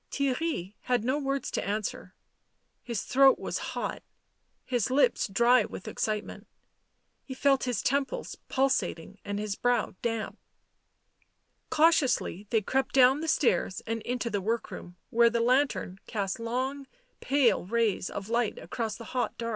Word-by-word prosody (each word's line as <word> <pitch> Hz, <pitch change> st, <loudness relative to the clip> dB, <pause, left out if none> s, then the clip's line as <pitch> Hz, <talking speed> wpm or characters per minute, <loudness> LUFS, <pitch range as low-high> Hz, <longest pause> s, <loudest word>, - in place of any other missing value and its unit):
Theirry 275 Hz, -, -1 dB
had 245 Hz, -3 st, 0 dB
no 260 Hz, +5 st, 0 dB
words 275 Hz, -1 st, -2 dB
to -, -, -2 dB
answer; 210 Hz, +1 st, -4 dB, 0.7 s
his 235 Hz, -5 st, -4 dB
throat 270 Hz, +1 st, +5 dB
was -, -, -3 dB, 0.2 s
hot, -, -, -3 dB, 0.6 s
his 245 Hz, -3 st, 0 dB
lips 255 Hz, -3 st, +3 dB
dry 235 Hz, +4 st, +4 dB
with 190 Hz, -, -8 dB
excitement, 215 Hz, -1 st, -3 dB, 0.8 s
he 260 Hz, -, -8 dB
felt 275 Hz, 0 st, +2 dB
his 245 Hz, -5 st, -1 dB
temples 280 Hz, -, -1 dB
pul 265 Hz, +1 st, +3 dB
sating 195 Hz, -6 st, -2 dB
and 205 Hz, 0 st, -3 dB
his 210 Hz, -1 st, -2 dB
brow 245 Hz, -1 st, +1 dB
damp. 225 Hz, -2 st, -3 dB, 1.3 s
Cautiously 300 Hz, -, +2 dB
they 225 Hz, -, +2 dB
crept 265 Hz, +6 st, -1 dB
down 260 Hz, +1 st, +6 dB
the 325 Hz, -, -4 dB
stairs 190 Hz, -, +1 dB
and 225 Hz, 0 st, -3 dB
into 240 Hz, 0 st, -3 dB
the 205 Hz, -1 st, -1 dB
work 225 Hz, +4 st, -2 dB
room, 175 Hz, 0 st, -9 dB
where 235 Hz, 0 st, +5 dB
the 235 Hz, 0 st, 0 dB
lantern 245 Hz, -6 st, +1 dB
cast 200 Hz, -2 st, -2 dB
long 260 Hz, +4 st, -3 dB, 0.3 s
pale 275 Hz, -3 st, +2 dB
rays 225 Hz, -4 st, 0 dB
of 195 Hz, 0 st, -6 dB
light 235 Hz, -1 st, 0 dB
across 225 Hz, -3 st, -4 dB
the 230 Hz, -, -9 dB
hot 245 Hz, -3 st, -1 dB
dark. 230 Hz, 0 st, -3 dB
235 Hz, 150 wpm, -28 LUFS, 215-265 Hz, 1.3 s, down